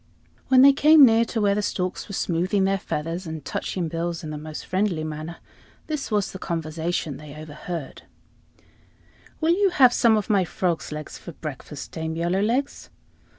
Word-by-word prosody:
When 260 0 +6
they 280 0 +8
came 300 +1 +7
near 230 -1 +4
to 230 - -3
where 205 -2 +3
the 210 - 0
storks 185 -2 -3
were 200 - -4
smoothing 185 +3 0
their 195 0 +1
feathers 165 +2 -4
and 160 -1 -6
touching 180 -3 -3
bills 165 +1 -3
in 155 - -5
the 150 - -5
most 155 0 -7
friendly 185 -4 0
manner, 155 +2 -6 0.5
this 305 -3 -4
was 210 -3 0
the 190 - -8
conversation 160 -3 -3
they 150 -1 -11
overheard, 155 0 -7 1.4
"Will 325 +2 +4
you 395 +2 +3
have 265 -9 +5
some 225 -2 +4
of 210 - -2
my 200 -3 +3
frog's 175 -2 -2
legs 150 -1 -7
for 170 - -9
breakfast, 150 -1 -8
Dame 160 0 -4
Yellowlegs?" 200 +11 -1
175 Hz, 170 wpm, -24 LUFS, 160-215 Hz, 1.4 s, they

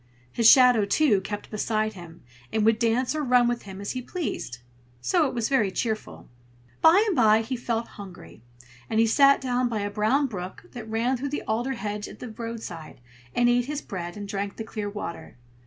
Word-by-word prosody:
His 225 - +5
shadow, 250 -4 +7
too, 210 -2 +3
kept 205 +1 -6
beside 215 0 -1
him, 175 -3 -12 0.3
and 220 -1 +1
would 225 0 +3
dance 235 +3 +1
or 305 -1 -2
run 250 -2 +4
with 240 0 -1
him 195 -1 -10
as 200 - -4
he 255 - -4
pleased; 250 - -5 0.4
so 320 - +2
it 260 - -6
was 230 -2 0
very 260 -8 +2
cheerful. 220 +2 -4 0.5
By 360 +6 +6
and 410 -5 0
by 220 -3 +5
he 240 +4 -4
felt 235 -1 -2
hungry; 175 - -12 0.5
and 220 - +1
he 225 - +5
sat 275 +5 +5
down 250 -1 0
by 220 -3 -2
a 205 0 -3
brown 220 +8 +2
brook 185 -7 -6
that 230 -3 -9
ran 235 +4 0
through 280 +3 -4
the 290 - -4
alder 240 +5 -1
hedge 210 -3 -4
by - - -10
the 250 - -9
roadside, 220 - -7 0.4
and 240 - +3
ate 245 0 +3
his 295 +2 -4
bread, 175 -1 -6
and 205 -1 -6
drank 200 0 -4
the 225 - -4
clear 215 -2 -5
water. 200 -9 -7
225 Hz, 205 wpm, -25 LUFS, 205-250 Hz, 0.5 s, shadow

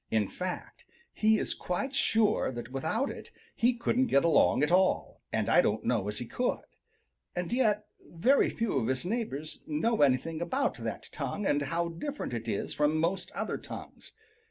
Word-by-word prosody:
In 110 -3 +2
fact, 185 0 -5 0.3
he 220 0 +3
is - - -2
quite 255 +10 -3
sure 225 - +2
that 120 +1 -7
without 160 - -1
it - - -9 0.3
he 240 +1 +3
couldn't 250 +2 +1
get 140 +3 +3
along 160 -3 +4
at 150 - +2
all, 185 +1 +2
and - - 0
I - - +6
don't 110 +1 0
know 110 -5 0
as 105 0 -3
he 120 - -4
could. 245 - -1 0.7
And 180 +4 -2
yet 215 -4 +2 0.2
very 240 +12 +3
few 225 - 0
of 115 - -1
his 130 +4 -1
neighbors 180 - -3
know 215 +10 +1
anything 145 +4 +2
about 255 +12 0
that - - -5
tongue 205 - -3
and 145 -5 +2
how 170 +5 -1
different 220 - -5
it 115 -1 -4
is 100 - -2
from 150 +1 +2
most 170 +4 0
other - - -2
tongues. - - -10
170 Hz, 180 wpm, -30 LUFS, 135-225 Hz, 0.7 s, I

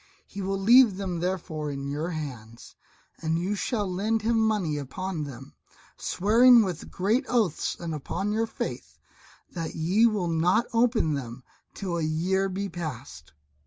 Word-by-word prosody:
He 200 - -8
will 195 +1 -1
leave 230 0 +6
them 185 -4 -3
therefore 165 -4 -3
in 140 -1 -5
your 150 +4 -3
hands, 125 -9 -7 0.5
and 160 0 0
you 180 +4 -1
shall 210 +1 -1
lend 210 +4 -1
him 230 0 +2
money 205 -9 +1
upon 165 +3 -4
them, 135 -2 -10 0.4
swearing 230 +5 +5
with 180 -5 -5
great 215 +9 +1
oaths 220 -10 +1
and 165 -2 -4
upon 175 +7 -3
your 225 +2 0
faith, - - -6 0.5
that 165 -3 -5
ye 185 +9 +3
will 205 -6 -1
not 175 +8 +2
open 230 -9 +2
them 125 -2 -6 0.3
till 180 -4 -3
a - - -1
year 180 +5 0
be 195 +2 -3
past." 140 - -7
180 Hz, 155 wpm, -27 LUFS, 155-210 Hz, 0.5 s, leave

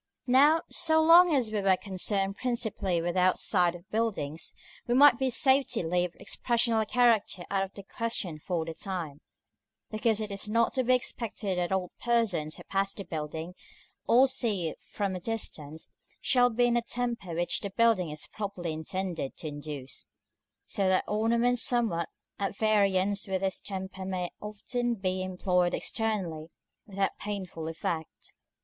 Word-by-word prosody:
§ - - -60 0.2
II. - - -1
Now, 295 +5 +6
so 320 -2 +2
long 335 +2 +7
as 240 -5 +1
we 210 -2 -1
were 190 -1 +4
concerned 195 0 -1
principally 215 -8 -1
with 175 0 -1
the 185 - +1
outside 180 -1 +2
of 175 +2 -13
buildings, 195 -9 -2 0.3
we 240 - +2
might 275 -2 +7
with 260 -2 +1
safety 270 -6 +3
leave 175 +1 0
expressional 230 -2 +1
character 225 -7 +2
out 195 -1 +1
of 195 - -7
the 200 - -9
question 195 -6 -3
for 165 0 -2
the 165 - -5
time, 165 -4 -5 0.7
because 220 0 +1
it 215 -1 -4
is 200 +1 -3
not 230 +2 +2
to 260 - +1
be 255 +1 +4
expected 215 -6 -2
that 175 0 -1
all 190 -2 -1
persons 210 -11 +1
who - - -11
pass 195 0 -1
the 200 - -6
building, 160 +1 -5 0.5
or 255 +3 +6
see 220 -10 0
it - - -11
from 200 -2 -3
a - - -4
distance, 160 -8 -5 0.3
shall 245 -1 +3
be 245 +1 +2
in 240 - +2
the 240 - +2
temper 235 -7 -3
which 175 +1 +1
the 200 - -4
building 220 -4 +2
is 150 0 -6
properly 195 -6 -5
intended 170 -2 -4
to 160 - -5
induce; 145 -2 -8 0.6
so 195 -2 0
that 185 0 +3
ornaments 235 +3 +2
somewhat 225 -10 +1 0.3
at 200 0 -2
variance 205 -2 +2
with 190 -1 -1
this 190 -1 -1
temper 190 -1 -6
may 185 -2 -3
often 235 +4 -2
be 185 -2 -2
employed 180 -1 +1
externally 185 -8 -2 0.4
without 195 -1 0
painful 190 -6 -5
effect. 160 0 -5
195 Hz, 165 wpm, -29 LUFS, 175-230 Hz, 0.7 s, long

